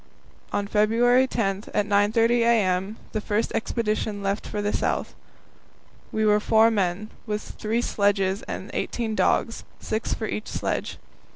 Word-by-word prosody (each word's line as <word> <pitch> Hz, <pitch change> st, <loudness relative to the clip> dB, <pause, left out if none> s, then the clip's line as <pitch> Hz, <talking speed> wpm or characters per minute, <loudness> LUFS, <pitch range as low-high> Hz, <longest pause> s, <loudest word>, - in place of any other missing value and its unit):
On 205 Hz, -, -1 dB
February 230 Hz, +5 st, +3 dB
10, 200 Hz, -4 st, -1 dB
at 210 Hz, -, +2 dB
9.30 220 Hz, +3 st, +3 dB
a.m., 210 Hz, -3 st, +2 dB
the 215 Hz, -, -2 dB
first 210 Hz, +2 st, -1 dB
expedition 215 Hz, -3 st, -1 dB
left 200 Hz, +1 st, -2 dB
for 210 Hz, -, -4 dB
the 205 Hz, 0 st, -1 dB
South. -, -, -1 dB, 1.0 s
We 220 Hz, 0 st, 0 dB
were 210 Hz, 0 st, +4 dB
four 220 Hz, +2 st, +4 dB
men, 200 Hz, 0 st, -1 dB, 0.2 s
with 210 Hz, 0 st, -2 dB, 0.2 s
three 225 Hz, +3 st, 0 dB
sledges 200 Hz, -2 st, +1 dB
and -, -, -6 dB
eighteen 230 Hz, -2 st, -2 dB
dogs, 230 Hz, +1 st, +1 dB, 0.2 s
six 220 Hz, +1 st, -3 dB
for 220 Hz, -, -4 dB
each 215 Hz, 0 st, -4 dB
sledge. -, -, -3 dB
215 Hz, 145 wpm, -25 LUFS, 205-225 Hz, 1.0 s, were